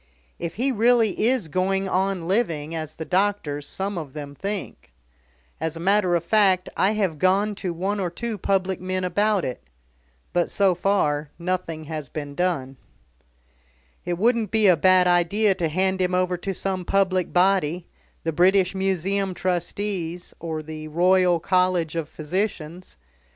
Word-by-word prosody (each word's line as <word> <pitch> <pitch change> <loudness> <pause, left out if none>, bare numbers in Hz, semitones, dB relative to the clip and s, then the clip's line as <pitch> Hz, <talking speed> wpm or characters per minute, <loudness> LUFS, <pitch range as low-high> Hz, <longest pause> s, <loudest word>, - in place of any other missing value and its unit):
If 170 -1 -4
he 260 +5 +1
really 225 -2 +3
is 250 -8 +1
going 190 +4 0
on 190 -2 -1
living 165 -7 0
as 155 -1 -5
the 160 - -6
doctors, 180 -7 0
some 195 -1 -3
of 145 -5 -8
them, 145 -2 -7
think. 200 - -5 0.7
As 160 0 -3
a - - -7
matter 185 0 +2
of 170 - 0
fact, 190 -1 +3
I 200 +3 +2
have 190 -8 -1
gone 195 +3 +2
to 185 - -2
one 190 +5 -2
or 185 -2 -1
two 220 +4 -5
public 190 -1 0
men 185 0 -2
about 205 +2 +1
it. 125 - -5 0.7
But, 175 -1 +1
so 195 -2 +3
far, 165 -6 0
nothing 170 -2 -3
has 155 -3 -6
been 145 0 -6
done." 140 -6 -1 1.3
"It 175 -1 -2
wouldn't 230 +1 +2
be 220 +1 +2
a 185 -3 +7
bad 185 +3 +4
idea 180 +4 +3
to 170 -3 -2
hand 190 +3 0
him 180 0 +1
over 180 0 +1
to 185 +2 -4
some 190 0 -3
public 185 -1 +1
body 180 -2 +2 0.4
the 165 - -1
British 185 +3 +3
Museum 190 0 -1
Trustees, 180 -1 -3
or 160 -2 -4
the 155 0 -7
Royal 180 +2 +3
College 180 -2 +1
of 160 -2 -3
Physicians. 180 +1 -4
185 Hz, 155 wpm, -24 LUFS, 165-195 Hz, 1.3 s, a